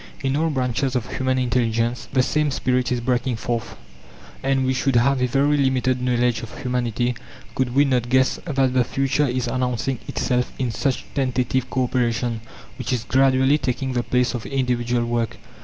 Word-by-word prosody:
In 135 Hz, 0 st, +1 dB
all 160 Hz, +2 st, +1 dB
branches 130 Hz, -1 st, -1 dB
of 125 Hz, -2 st, -2 dB
human 130 Hz, 0 st, +1 dB
intelligence 120 Hz, -1 st, 0 dB
the 130 Hz, -1 st, +3 dB
same 150 Hz, +3 st, +1 dB
spirit 125 Hz, -2 st, 0 dB
is 125 Hz, -, +1 dB
breaking 125 Hz, +1 st, 0 dB
forth, 115 Hz, 0 st, -3 dB, 0.7 s
and 135 Hz, -1 st, +1 dB
we 130 Hz, -, +1 dB
should 130 Hz, 0 st, 0 dB
have 130 Hz, +2 st, +3 dB
a 125 Hz, -, +3 dB
very 140 Hz, +4 st, +2 dB
limited 130 Hz, -2 st, +1 dB
knowledge 125 Hz, -1 st, +1 dB
of 115 Hz, -, -9 dB
humanity 125 Hz, -1 st, 0 dB, 0.4 s
could 130 Hz, -1 st, -1 dB
we 145 Hz, +1 st, +5 dB
not 125 Hz, -3 st, 0 dB
guess 130 Hz, +1 st, +3 dB
that 135 Hz, -5 st, +1 dB
the 130 Hz, -1 st, +4 dB
future 135 Hz, +4 st, 0 dB
is 125 Hz, 0 st, -1 dB
announcing 125 Hz, +1 st, -1 dB
itself 125 Hz, -1 st, -1 dB
in 125 Hz, -3 st, -1 dB
such 135 Hz, +3 st, -1 dB
tentative 130 Hz, -1 st, 0 dB
co 130 Hz, -, 0 dB
operation, 120 Hz, -2 st, 0 dB, 0.4 s
which -, -, -3 dB
is 125 Hz, -3 st, 0 dB
gradually 130 Hz, +3 st, +3 dB
taking 130 Hz, 0 st, -2 dB
the 120 Hz, -, +1 dB
place 125 Hz, 0 st, +1 dB
of 120 Hz, -3 st, -5 dB
individual 125 Hz, -3 st, 0 dB
work. 120 Hz, -1 st, -1 dB
125 Hz, 175 wpm, -22 LUFS, 120-130 Hz, 0.7 s, we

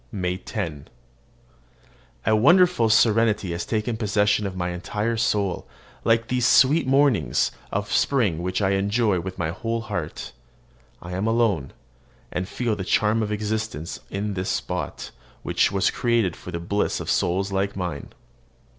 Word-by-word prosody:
MAY 90 Hz, -3 st, -2 dB
10. 85 Hz, -8 st, -5 dB, 1.4 s
A 110 Hz, -, +4 dB
wonderful 170 Hz, -, +5 dB
serenity 110 Hz, -3 st, +3 dB
has 85 Hz, -, -4 dB
taken 110 Hz, +1 st, -1 dB
possession 105 Hz, -1 st, +1 dB
of 95 Hz, -, -6 dB
my 90 Hz, -1 st, -2 dB
entire 105 Hz, +6 st, -2 dB
soul, 105 Hz, -4 st, 0 dB, 0.4 s
like 115 Hz, 0 st, +2 dB
these 125 Hz, -1 st, +1 dB
sweet 140 Hz, +2 st, +5 dB
mornings 130 Hz, -, +2 dB, 0.2 s
of 105 Hz, +1 st, -2 dB
spring 105 Hz, -, +2 dB
which 90 Hz, +3 st, -1 dB
I 95 Hz, -, +2 dB
enjoy 100 Hz, 0 st, +1 dB
with 95 Hz, +2 st, -6 dB
my 85 Hz, -3 st, -1 dB
whole 115 Hz, +6 st, -3 dB
heart. 100 Hz, -8 st, -5 dB, 0.7 s
I 85 Hz, -, -8 dB
am 95 Hz, +4 st, -1 dB
alone, 110 Hz, -, +1 dB, 0.6 s
and 90 Hz, +2 st, -3 dB
feel 120 Hz, -3 st, -1 dB
the 100 Hz, -, -4 dB
charm 105 Hz, +4 st, +2 dB
of 105 Hz, -1 st, -2 dB
existence 105 Hz, -5 st, -3 dB
in 100 Hz, +1 st, -3 dB
this 95 Hz, -1 st, -3 dB
spot, -, -, -3 dB, 0.3 s
which -, -, +2 dB
was 95 Hz, -1 st, +2 dB
created 115 Hz, -8 st, +1 dB
for -, -, -11 dB
the 85 Hz, -1 st, -4 dB
bliss 100 Hz, +5 st, -1 dB
of -, -, -6 dB
souls 95 Hz, +3 st, 0 dB
like 100 Hz, +1 st, -1 dB
mine. 90 Hz, -7 st, -4 dB
105 Hz, 150 wpm, -24 LUFS, 90-115 Hz, 1.4 s, wonderful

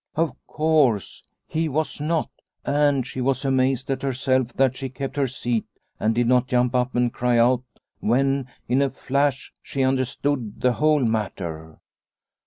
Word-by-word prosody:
Of 160 Hz, -4 st, +1 dB
course, 150 Hz, -, +1 dB, 0.2 s
he 160 Hz, 0 st, -1 dB
was 155 Hz, +2 st, -2 dB
not 160 Hz, +1 st, 0 dB, 0.3 s
a 145 Hz, -2 st, +2 dB
She 130 Hz, -, -5 dB
was 135 Hz, +1 st, 0 dB
amazed 130 Hz, -1 st, +1 dB
at 135 Hz, 0 st, -2 dB
herself 130 Hz, -2 st, 0 dB
that 130 Hz, -1 st, +2 dB
she 135 Hz, 0 st, -4 dB
kept 135 Hz, +2 st, -5 dB
her 140 Hz, -2 st, +1 dB
seat 120 Hz, -3 st, -2 dB, 0.3 s
and 110 Hz, +1 st, +1 dB
did 120 Hz, 0 st, +2 dB
not 125 Hz, +1 st, +3 dB
jump 125 Hz, 0 st, +1 dB
up 125 Hz, 0 st, 0 dB
and 120 Hz, -1 st, +1 dB
cry 125 Hz, -1 st, +1 dB
out 120 Hz, +1 st, +4 dB, 0.4 s
when, 135 Hz, +3 st, +1 dB, 0.2 s
in 130 Hz, +3 st, +2 dB
a 140 Hz, -, +2 dB
flash, 140 Hz, +1 st, -1 dB
she 135 Hz, -, -2 dB
understood 130 Hz, -3 st, -1 dB
the 125 Hz, -1 st, +2 dB
whole 150 Hz, -1 st, +2 dB
matter. 85 Hz, -8 st, -3 dB
130 Hz, 160 wpm, -23 LUFS, 120-140 Hz, 0.4 s, out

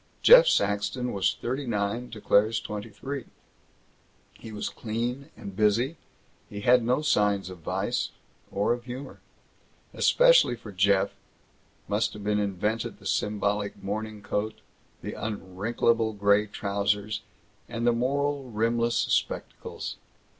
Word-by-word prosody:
Jeff -, -, +9 dB
Saxton 120 Hz, -, +1 dB
was 100 Hz, -2 st, +1 dB
thirty 130 Hz, +3 st, -3 dB
nine 110 Hz, +2 st, -1 dB
to 110 Hz, -, -9 dB
Claire's 110 Hz, +2 st, +3 dB
twenty 105 Hz, 0 st, -6 dB
three. 135 Hz, +5 st, -6 dB, 1.1 s
He 110 Hz, -, -11 dB
was 105 Hz, -1 st, -4 dB
clean 120 Hz, +5 st, -4 dB
and 100 Hz, -2 st, -8 dB
busy; 110 Hz, -, +2 dB, 0.5 s
he 100 Hz, 0 st, -6 dB
had 125 Hz, +2 st, +5 dB
no 125 Hz, +6 st, +1 dB
signs 105 Hz, -8 st, +2 dB
of 90 Hz, -, -10 dB
vice 80 Hz, -, -1 dB, 0.4 s
or 105 Hz, +4 st, +1 dB
humor. 125 Hz, +3 st, -8 dB, 0.7 s
Especially -, -, +5 dB
for 115 Hz, -2 st, -11 dB
Jeff 100 Hz, +1 st, +3 dB, 0.8 s
must -, -, 0 dB
have 105 Hz, -, -9 dB
been 105 Hz, 0 st, +1 dB
invented 105 Hz, +4 st, -2 dB
the 100 Hz, -, -18 dB
symbolic 105 Hz, +1 st, -1 dB
morning 105 Hz, +1 st, -4 dB
coat, 105 Hz, +2 st, -3 dB, 0.4 s
the -, -, -4 dB
unwrinkable 110 Hz, +2 st, -1 dB
gray 100 Hz, +1 st, +3 dB
trousers, 100 Hz, +1 st, -1 dB, 0.5 s
and 115 Hz, +1 st, -3 dB
the 120 Hz, -, +4 dB
moral 140 Hz, +2 st, -1 dB
rimless 115 Hz, +1 st, +1 dB
spectacles. -, -, -2 dB
110 Hz, 125 wpm, -27 LUFS, 100-120 Hz, 1.1 s, Jeff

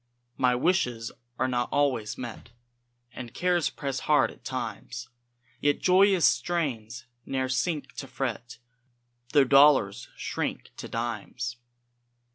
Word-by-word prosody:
My 125 Hz, -1 st, +3 dB
wishes 125 Hz, -7 st, 0 dB, 0.3 s
are 130 Hz, -, +1 dB
not 120 Hz, -1 st, -1 dB
always 130 Hz, -7 st, +1 dB
met, 120 Hz, -2 st, -7 dB, 0.6 s
And 120 Hz, -2 st, -8 dB
cares 175 Hz, -2 st, +2 dB
press 135 Hz, -2 st, -4 dB
hard 150 Hz, -1 st, +3 dB
at -, -, -18 dB
times; 130 Hz, -1 st, -5 dB, 0.5 s
Yet 145 Hz, 0 st, +2 dB
joyous 190 Hz, -1 st, +5 dB
strains 130 Hz, -9 st, 0 dB, 0.2 s
ne'er 130 Hz, +1 st, -1 dB
sink 140 Hz, 0 st, -1 dB
to 135 Hz, -, -5 dB
fret, 120 Hz, -3 st, -4 dB, 0.8 s
Tho' 145 Hz, -2 st, +7 dB
dollars 135 Hz, -6 st, +5 dB
shrink -, -, -3 dB
to -, -, -6 dB
dimes. 120 Hz, +2 st, -4 dB
130 Hz, 115 wpm, -27 LUFS, 120-145 Hz, 0.8 s, Tho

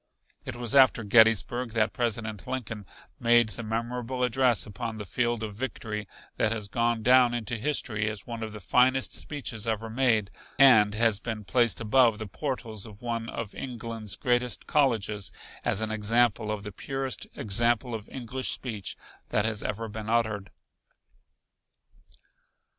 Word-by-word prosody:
It 130 Hz, -, -4 dB
was 120 Hz, -2 st, -2 dB
after 130 Hz, -4 st, +6 dB
Gettysburg 115 Hz, +2 st, +4 dB
that 115 Hz, -1 st, +1 dB
President 110 Hz, -4 st, -3 dB
Lincoln 110 Hz, -6 st, -5 dB, 0.3 s
made 120 Hz, -1 st, +4 dB
the 120 Hz, -, -2 dB
memorable 120 Hz, +3 st, -3 dB
address 125 Hz, -1 st, +2 dB
upon 110 Hz, +2 st, -5 dB
the 105 Hz, -, -6 dB
field 120 Hz, +3 st, -1 dB
of 105 Hz, -2 st, -4 dB
victory 105 Hz, -2 st, -4 dB, 0.3 s
that 110 Hz, -, +2 dB
has 110 Hz, -3 st, -3 dB
gone 115 Hz, +1 st, 0 dB
down 125 Hz, 0 st, +5 dB
into 120 Hz, 0 st, -3 dB
history 115 Hz, -4 st, -1 dB
as 105 Hz, -2 st, -7 dB
one 115 Hz, -1 st, -6 dB
of 110 Hz, -1 st, -4 dB
the 105 Hz, -, -8 dB
finest 130 Hz, +4 st, +2 dB
speeches 125 Hz, -7 st, -4 dB
ever 110 Hz, 0 st, -2 dB
made 110 Hz, -5 st, +2 dB, 0.3 s
and 110 Hz, -6 st, +6 dB
has 110 Hz, -2 st, +3 dB
been 110 Hz, -1 st, -5 dB
placed 120 Hz, +3 st, +2 dB
above 115 Hz, 0 st, +4 dB
the 110 Hz, -, -5 dB
portals 115 Hz, -3 st, -4 dB
of 105 Hz, +1 st, -13 dB
one 115 Hz, -1 st, -3 dB
of 115 Hz, -3 st, -5 dB
England's 115 Hz, -4 st, -5 dB
greatest 125 Hz, -2 st, 0 dB
colleges 105 Hz, -, +1 dB, 0.3 s
as 100 Hz, -, +1 dB
an 110 Hz, 0 st, -2 dB
example 110 Hz, 0 st, +2 dB
of 105 Hz, -1 st, -3 dB
the 105 Hz, -, -6 dB
purest 135 Hz, +5 st, -3 dB
example 115 Hz, +4 st, +1 dB
of 110 Hz, -2 st, -6 dB
English 130 Hz, +1 st, -4 dB
speech 110 Hz, -6 st, -4 dB, 0.3 s
that 105 Hz, -, +1 dB
has 110 Hz, -2 st, -1 dB
ever 110 Hz, +2 st, -3 dB
been 110 Hz, 0 st, -6 dB
uttered. 110 Hz, -4 st, 0 dB
115 Hz, 155 wpm, -28 LUFS, 105-120 Hz, 0.3 s, after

